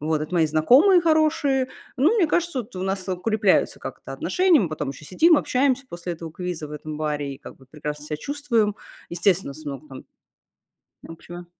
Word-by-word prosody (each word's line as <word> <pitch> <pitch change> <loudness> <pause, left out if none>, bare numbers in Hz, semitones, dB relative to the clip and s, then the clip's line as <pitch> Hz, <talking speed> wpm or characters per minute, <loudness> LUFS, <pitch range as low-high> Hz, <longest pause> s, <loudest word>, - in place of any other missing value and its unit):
Вот. 155 +1 0
Это 155 +4 -5
мои 165 -2 +4
знакомые 255 - +5
хорошие. 310 -5 +2 0.3
Ну, 300 - +3
мне 380 -7 +4
кажется, 340 -2 0
вот 230 -2 -11
у 185 - -4
нас 190 0 -3
укрепляются 195 +2 +1
как-то - - -8
отношения. 365 -3 +3
Мы 185 - 0
потом 150 -3 -4
еще 140 - -11
сидим, 320 - +4
общаемся 270 +1 +1
после 175 0 -5
этого 165 0 -8
квиза 175 -4 -5
в - - -10
этом 150 0 -7
баре 145 -2 -2
и - - -15
как - - -12
бы 130 - -19
прекрасно 150 +1 -6
ся 150 - -3
чувствуем. 235 - 0 0.3
Естественно, 175 -3 +1
у - - -14
нас 155 - -12
много 145 +1 -7
там 135 -1 -10 1.1
общего. 175 +2 -10
180 Hz, 190 wpm, -23 LUFS, -, 1.1 s, знакомые